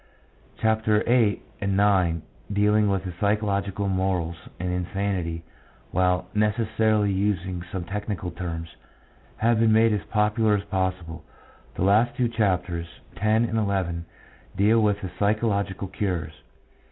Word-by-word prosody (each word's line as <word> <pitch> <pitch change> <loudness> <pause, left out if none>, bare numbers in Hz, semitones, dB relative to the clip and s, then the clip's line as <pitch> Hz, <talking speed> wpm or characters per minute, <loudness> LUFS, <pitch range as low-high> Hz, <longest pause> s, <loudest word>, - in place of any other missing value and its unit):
Chapters 110 -1 +2
VIII. 115 -4 +3 0.2
and 100 0 +1
IX., 90 -6 +2 0.3
dealing 105 +1 +3
with 95 -1 0 0.2
psychological 100 -1 0
morals 95 -3 -1
and 90 0 -2
insanity, 90 -2 -2 0.5
while 90 0 +2
necessarily 105 -1 +2
using 95 -2 -1
some 95 -2 -3
technical 100 -1 -4
terms, 85 -2 -6 0.6
have 115 0 +2
been 115 -1 +4
made 110 0 +5
as 105 - 0
popular 105 0 +2
as 100 - -2
possible; 95 -4 -3 0.5
the - - -1
last 105 +5 +3
two 125 -2 +2
chapters, 90 -6 0 0.3
X. - - -13
and 110 +2 +3
XL, 100 -6 0 0.6
deal 110 +4 +4
with 105 -1 +2
the 95 - -5
psychological 100 -2 0
cures. 90 -5 -3
100 Hz, 125 wpm, -25 LUFS, 90-105 Hz, 0.6 s, made